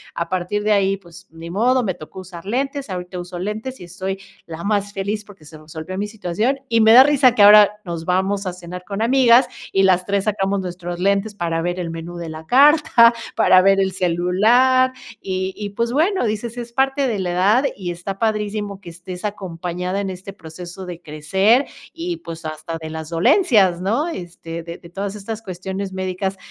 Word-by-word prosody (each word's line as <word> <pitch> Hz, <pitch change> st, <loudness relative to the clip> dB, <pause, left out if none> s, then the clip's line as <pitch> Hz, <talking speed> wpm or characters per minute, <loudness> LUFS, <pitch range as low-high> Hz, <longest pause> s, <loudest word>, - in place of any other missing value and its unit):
a 170 Hz, 0 st, -3 dB
partir 185 Hz, +3 st, -1 dB
de 215 Hz, -, +1 dB
ahí 195 Hz, -1 st, +3 dB
pues 185 Hz, 0 st, -16 dB
ni 165 Hz, +1 st, -10 dB
modo 245 Hz, +7 st, +2 dB
me 190 Hz, -4 st, -1 dB
tocó 170 Hz, +2 st, -11 dB
usar 180 Hz, -2 st, -11 dB
lentes, 270 Hz, +4 st, -2 dB
ahorita 180 Hz, -1 st, -5 dB
uso 175 Hz, 0 st, -7 dB
lentes 215 Hz, +8 st, -5 dB
y -, -, -7 dB
estoy 190 Hz, +2 st, -5 dB, 0.3 s
la 165 Hz, 0 st, -8 dB
más 205 Hz, -1 st, -1 dB
feliz 205 Hz, +2 st, -3 dB
porque 200 Hz, -5 st, -16 dB
se 155 Hz, +1 st, -12 dB
resolvió 160 Hz, +4 st, -8 dB
mi 205 Hz, +1 st, -2 dB
situación 215 Hz, +5 st, -1 dB
y 230 Hz, 0 st, +3 dB
me 220 Hz, +1 st, +7 dB
da 255 Hz, +2 st, +10 dB
risa 270 Hz, -4 st, +4 dB
que 210 Hz, -, +3 dB
ahora 210 Hz, 0 st, +7 dB
nos 170 Hz, -3 st, -5 dB
vamos 190 Hz, +3 st, 0 dB
a 185 Hz, -, -3 dB
cenar 180 Hz, 0 st, -9 dB
con 200 Hz, +3 st, -4 dB
amigas 250 Hz, +1 st, +5 dB, 0.3 s
y 195 Hz, -, +3 dB
las 185 Hz, -1 st, +3 dB
3 200 Hz, -1 st, 0 dB
sacamos 200 Hz, -2 st, 0 dB
nuestros 175 Hz, -1 st, -6 dB
lentes 200 Hz, +2 st, +1 dB
para 165 Hz, -3 st, -2 dB
ver 175 Hz, +2 st, -2 dB
el 170 Hz, -, -4 dB
menú 165 Hz, +1 st, -7 dB
de 170 Hz, -1 st, -6 dB
la 160 Hz, 0 st, -8 dB
carta, 275 Hz, -, +6 dB, 0.2 s
para 185 Hz, 0 st, +6 dB
ver 195 Hz, +1 st, +4 dB
el 190 Hz, 0 st, 0 dB
celular, 210 Hz, +9 st, +3 dB, 0.3 s
y 190 Hz, 0 st, -3 dB
y 205 Hz, -1 st, -4 dB
pues 235 Hz, +3 st, -1 dB
bueno, 335 Hz, +5 st, +1 dB
dices, 220 Hz, +2 st, -3 dB
es 240 Hz, -1 st, -6 dB
parte 270 Hz, +2 st, +1 dB
de 215 Hz, -4 st, -2 dB
la 180 Hz, -2 st, -2 dB
edad 205 Hz, +9 st, +3 dB
y 180 Hz, -3 st, -4 dB
está 175 Hz, +3 st, -6 dB
padrísimo 210 Hz, -2 st, -2 dB
que 175 Hz, -, -11 dB
estés 180 Hz, +3 st, -8 dB
acompañada 180 Hz, -1 st, -4 dB
en 195 Hz, -, -3 dB
este 185 Hz, +1 st, -8 dB
proceso 180 Hz, +2 st, -10 dB
de 175 Hz, -1 st, -8 dB
crecer 190 Hz, -, +2 dB, 0.3 s
y 340 Hz, +1 st, -4 dB
pues 165 Hz, -, -9 dB
hasta 155 Hz, +1 st, -5 dB
de 160 Hz, -, -6 dB
las 160 Hz, 0 st, -6 dB
dolencias 195 Hz, -, +3 dB
¿no?, 230 Hz, -, 0 dB
este, 170 Hz, -, -7 dB
de 170 Hz, 0 st, -8 dB
de 170 Hz, -, -15 dB
todas 195 Hz, +3 st, -5 dB
estas 215 Hz, +2 st, -6 dB
cuestiones 190 Hz, 0 st, -5 dB
médicas 190 Hz, +1 st, -3 dB
195 Hz, 200 wpm, -20 LUFS, 175-220 Hz, 0.3 s, da